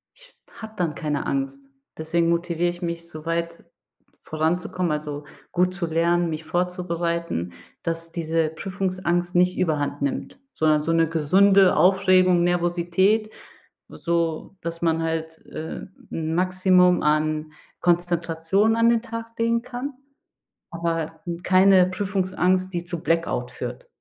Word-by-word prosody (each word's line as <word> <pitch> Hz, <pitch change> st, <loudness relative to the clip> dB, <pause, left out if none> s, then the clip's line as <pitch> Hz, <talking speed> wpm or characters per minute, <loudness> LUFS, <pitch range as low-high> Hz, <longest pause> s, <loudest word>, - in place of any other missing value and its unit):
Ich -, -, -18 dB, 0.2 s
habe 220 Hz, -1 st, -9 dB
dann 170 Hz, -4 st, -1 dB
keine 150 Hz, -3 st, -2 dB
Angst. 275 Hz, 0 st, -2 dB, 0.4 s
Deswegen 165 Hz, +1 st, 0 dB
motiviere 170 Hz, 0 st, 0 dB
ich 175 Hz, +1 st, -7 dB
mich, 170 Hz, 0 st, -4 dB
so 155 Hz, -1 st, -10 dB
weit 170 Hz, 0 st, -3 dB, 0.6 s
voranzukommen 170 Hz, +2 st, -1 dB
also, 150 Hz, -1 st, -5 dB, 0.3 s
gut 180 Hz, +1 st, +1 dB
zu 180 Hz, -2 st, -3 dB
lernen, 170 Hz, +1 st, +1 dB
mich 155 Hz, 0 st, -5 dB
vorzubereiten, 170 Hz, -, -2 dB, 0.3 s
dass 165 Hz, -1 st, -4 dB
diese 165 Hz, -1 st, 0 dB
Prüfungsangst 180 Hz, 0 st, -2 dB
nicht 180 Hz, +1 st, +3 dB
überhand 145 Hz, -4 st, -1 dB
nimmt, 140 Hz, -, -3 dB
sondern 155 Hz, -1 st, +2 dB
so 165 Hz, -, 0 dB
'ne 165 Hz, -1 st, +3 dB
gesunde 190 Hz, +5 st, +4 dB
Aufregung, 185 Hz, -2 st, +4 dB
Nervosität, 175 Hz, +5 st, +1 dB, 0.6 s
so 170 Hz, +2 st, -2 dB
dass 170 Hz, 0 st, -5 dB
man 165 Hz, -1 st, +1 dB
halt, 160 Hz, 0 st, -3 dB
äh, 160 Hz, -, -6 dB, 0.3 s
'n 160 Hz, 0 st, -2 dB
Maximum 185 Hz, 0 st, +3 dB
an 155 Hz, 0 st, +1 dB, 0.3 s
Konzentration 175 Hz, +4 st, +1 dB
an 230 Hz, 0 st, +4 dB
den 230 Hz, -1 st, +3 dB
Tag 230 Hz, -1 st, -8 dB
legen 230 Hz, 0 st, +2 dB
kann, 250 Hz, +3 st, -6 dB, 0.8 s
aber 165 Hz, -1 st, -3 dB, 0.2 s
keine 185 Hz, 0 st, +6 dB
Prüfungsangst, 185 Hz, -1 st, 0 dB
die 175 Hz, 0 st, -2 dB
zu 170 Hz, -1 st, -6 dB
Blackout 165 Hz, 0 st, 0 dB
führt. -, -, -7 dB
175 Hz, 125 wpm, -24 LUFS, 165-185 Hz, 0.8 s, keine